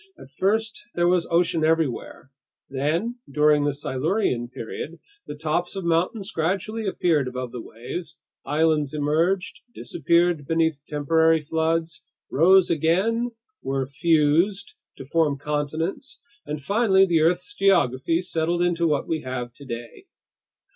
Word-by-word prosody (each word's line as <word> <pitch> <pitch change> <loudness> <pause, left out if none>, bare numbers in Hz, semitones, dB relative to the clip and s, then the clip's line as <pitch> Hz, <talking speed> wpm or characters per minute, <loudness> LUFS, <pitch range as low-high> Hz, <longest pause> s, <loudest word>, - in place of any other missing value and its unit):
At 135 - -14
first 220 +8 -1
there 175 0 +2
was 175 -1 +2
ocean 170 -1 +2
everywhere. 155 -4 -1 0.4
Then, 165 - -1
during 150 +1 +3
the 145 - +2
Silurian 140 - -1
period, 130 +7 -7 0.3
the - - -6
tops 160 +5 -2
of 195 - -4
mountains 180 +5 0
gradually 195 +6 -2
appeared 165 -7 +1
above 125 -1 -5
the 125 - -6
waves, 155 +10 -8 0.2
islands 155 -1 +1
emerged, 165 +6 0
disappeared 170 -3 +1
beneath 160 -3 +1
temporary 160 +2 +2
floods, 165 +2 -1 0.3
rose 185 +5 +5
again, 190 +10 +1 0.3
were 135 0 -1
fused 165 +7 +1 0.2
to 135 - -9
form 150 -1 +1
continents, 155 - -3 0.3
and 150 0 -3
finally 200 0 +4
the 170 -4 +2
earth's 175 - +1
geography 170 - +2
settled 170 0 0
into 170 -1 +1
what 150 -2 0
we 160 -1 -1
have 125 -2 -5
today. 120 -3 -9
160 Hz, 125 wpm, -24 LUFS, 145-175 Hz, 0.4 s, rose